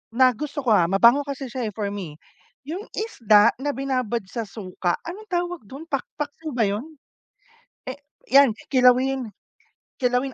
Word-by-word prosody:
na 255 0 +6
gusto 290 +1 -5
ko, 235 - +2
ah, 175 -5 +5
mabango 235 +9 +5
kasi 270 -2 -5
siya, 245 -3 -3
eh, - - -27
for 205 -2 -2
me. 185 -7 -6 0.5
Yung 365 +7 -5
isda 230 - +4
na 285 0 -2
binabad 255 -5 -1
sa 230 -3 -4
suka, 185 -3 -3
anong 400 +6 -8
tawag 350 -1 -1
dun, 275 +7 -9
pak 275 -2 0
paksiw 300 +1 -5
ba 235 - +2
yun? 250 +11 -4 0.9
Eh, 260 - -4 0.3
yan, 275 -2 +6 0.2
kilawin 255 -2 +3 0.7
kilawin, 250 +2 +1
255 Hz, 155 wpm, -24 LUFS, 220-285 Hz, 0.9 s, na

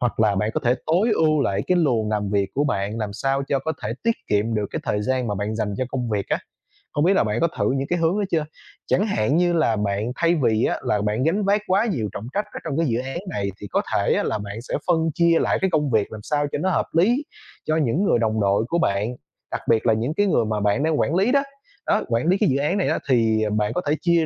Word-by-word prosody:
hoặc 120 -2 -1
là 105 -2 +3
bạn 105 +3 0
có - - 0
thể 120 +1 +4
tối 180 +8 +2
ưu 155 -4 +3
lại 100 -2 0
cái 180 - +2
luồng 115 -9 +1
làm 105 -2 -1
việc 100 -2 0
của 145 - +1
bạn 105 -4 -1
làm 105 -2 -3
sao 135 +5 -1
cho 140 - +2
có 160 +4 -3
thể 110 - -2
tiết 230 0 +1
kiệm 105 +2 +1
được 105 -1 0
cái - - -3
thời 105 - -1
gian 130 +2 0
mà 105 - -1
bạn 105 +3 -3
dành 105 -3 -2
cho 130 - 0
công 125 -3 -3
việc 100 -2 -2
á? - - +1 0.6
Không 145 - +1
biết 185 - +4
là - - +4
bạn 105 +1 -1
có 170 - +4
thử - - +1
những 135 +1 -1
cái 175 -1 0
hướng 170 +5 +1
đó 205 - 0
chưa? 160 -3 +1 0.4
Chẳng 205 - +2
hạn 120 - +1
như 175 -1 +2
là 155 -9 +2
bạn, 105 +3 -1
thay 170 0 +2
vì 115 -7 +2
á, - - 0
là 105 - 0
bạn 105 +4 0
gánh 190 +7 +1
vác 205 +1 +2
quá 195 +5 +3
nhiều 120 - -1
trọng 110 - -6
trách 205 - -1
ở - - -5
trong 155 -3 -3
cái 165 -2 +2
dự 115 0 0
án 135 +5 -4
này, 100 - -2
thì 100 - -6
có - - 0
thể - - +2
là - - -1
bạn 105 +2 -6
sẽ - - -8
phân 165 -2 +2
chia 170 0 +4
lại - - +1
cái 190 - +2
công 150 -6 0
việc 110 -2 +1
làm 110 - -8
sao 145 -1 0
cho - - -1
nó 190 - 0
hợp 185 - +1
lý 235 - +3 0.4
cho 155 0 +1
những 155 - +1
người 120 - +3
đồng 110 -1 0
đội 100 +2 +2
của 170 - +1
bạn. 105 +2 0 0.4
Đặc - - -3
biệt 115 0 +3
là 110 - +5
những 115 +7 -1
cái 205 +4 +1
người 120 - +2
mà 110 -1 -1
bạn 105 +7 +1
đang 160 -1 +1
quản 155 - +1
lý 200 +7 +3
đó, 280 0 +3 0.4
đó, - - +2
quản 115 +6 0
lý 185 +3 +4
cái 210 - +2
dự 135 - +1
án 150 +8 0
này 195 - +1
á, - - 0
thì 110 -3 +3
bạn 105 +1 0
có 180 - -1
thể 150 - +2
chia 170 -2 +3
130 Hz, 285 wpm, -23 LUFS, 110-165 Hz, 0.6 s, là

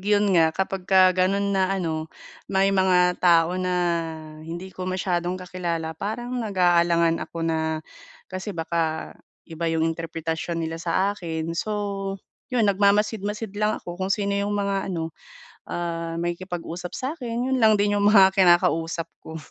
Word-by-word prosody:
yun 205 +1 +2
nga, 165 -2 +5
kapagka 190 -1 +3
ganun 195 +2 +1
na 190 -1 +2
ano, 160 -3 -3 0.4
may 195 0 +2
mga 180 -2 +4
tao 175 +1 +4
na 180 0 -1 0.7
hindi 175 +4 -7
ko 185 0 -5
masyadong 180 -1 -1
kakilala 175 -3 -3
parang 220 +8 -5
nag-aalangan 175 -5 +2
ako 165 -1 -4
na, 160 -1 -1 0.5
kasi 185 0 -5
baka 165 -1 -2 0.3
iba 165 0 -3
yung 160 0 +1
interpretasyon 165 0 -3
nila 165 +1 -5
saakin. 170 -2 -1
So 200 +1 -3 0.3
yun, 245 -3 +1
nagmamasid-masid 205 +1 +1
lang 215 0 +1
ako 175 +1 -8
kung 190 - -1
sino 200 -1 +1
yung 200 +1 0
mga 200 -1 -1
ano, 165 -3 -3 0.6
ah, 165 -1 -3
makikipag-usap 175 0 -4
sa’kin, 255 -3 -3
yun 260 - +1
lang 220 -1 +6
din 205 0 +1
yung 205 - +4
mga 190 -2 +7
kinakausap 175 -3 +2
ko. 160 - -9
185 Hz, 140 wpm, -24 LUFS, 165-200 Hz, 0.7 s, mga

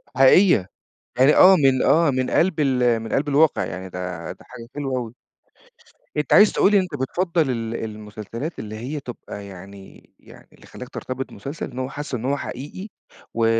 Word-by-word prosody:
حقيقية، 135 - +5 0.5
يعني، 135 +4 +6
آه، 190 +1 +8
من 135 -5 +3
آه، 165 -2 +4
من 130 -1 -1
قلْب 170 -3 +2
ال 125 -4 +2
من 115 0 -7
قلْب 145 +2 0
الواقع 150 +2 +3
يعني 95 +3 -6
ده 90 -2 -6
ده - - -17
حاجة 115 -2 -12
حلوة 135 -3 -2
أوي. 120 -1 -6 1.0
أنت 150 - 0
عايز 210 +1 +7
تقول 205 - +3
إن 200 - +6
أنت 180 -5 -5
بتفضّل 165 +1 0
ال 115 -1 -3
المسلسلات 110 - -7
اللي 110 0 -7
هي 130 +7 -5
تبقى 115 -5 -9
يعني 95 0 -13
يعني - - -17
اللي - - -19
خلّاك 125 - -10
ترتبط 130 +1 -6
بمسلسل 140 +10 -7
إن 125 - -7
هو 130 0 -3
حاسه 145 -2 -5
إن 115 - -7
هو 140 +2 0
حقيقي 145 - -7 0.5
و 115 0 +1
130 Hz, 180 wpm, -22 LUFS, 110-150 Hz, 1.0 s, آه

